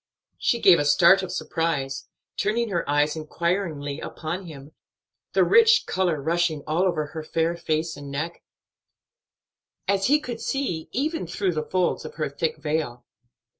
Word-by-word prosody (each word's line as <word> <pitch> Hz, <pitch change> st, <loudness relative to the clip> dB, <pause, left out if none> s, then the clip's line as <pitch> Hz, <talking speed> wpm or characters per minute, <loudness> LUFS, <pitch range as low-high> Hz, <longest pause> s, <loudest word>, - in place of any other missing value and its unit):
She 235 Hz, -, +1 dB
gave 185 Hz, -6 st, +7 dB
a -, -, +2 dB
start 170 Hz, +6 st, +6 dB
of 185 Hz, -2 st, -5 dB
surprise, 160 Hz, -7 st, -2 dB, 0.3 s
turning 225 Hz, +3 st, 0 dB
her 170 Hz, -6 st, -2 dB
eyes 145 Hz, +1 st, +2 dB
inquiringly 155 Hz, -2 st, -2 dB
upon 175 Hz, +4 st, -5 dB
him, 145 Hz, -2 st, -11 dB, 0.6 s
the -, -, +4 dB
rich 460 Hz, +1 st, +6 dB
color 180 Hz, -5 st, 0 dB
rushing 160 Hz, 0 st, 0 dB
all 160 Hz, +3 st, 0 dB
over 170 Hz, -5 st, 0 dB
her 160 Hz, -, -5 dB
fair 165 Hz, +2 st, 0 dB
face 160 Hz, -1 st, -2 dB
and 145 Hz, -1 st, -9 dB
neck; 155 Hz, +5 st, -4 dB, 1.5 s
as 195 Hz, -1 st, +2 dB
he 295 Hz, +3 st, +4 dB
could 240 Hz, -5 st, -6 dB
see, 215 Hz, -, -2 dB
even 300 Hz, -, -2 dB
through 180 Hz, +2 st, -1 dB
the 155 Hz, -, -1 dB
folds 185 Hz, -2 st, 0 dB
of -, -, -9 dB
her 155 Hz, -, -2 dB
thick 160 Hz, +3 st, -2 dB
veil. 150 Hz, -6 st, -3 dB
165 Hz, 155 wpm, -25 LUFS, 155-190 Hz, 1.5 s, gave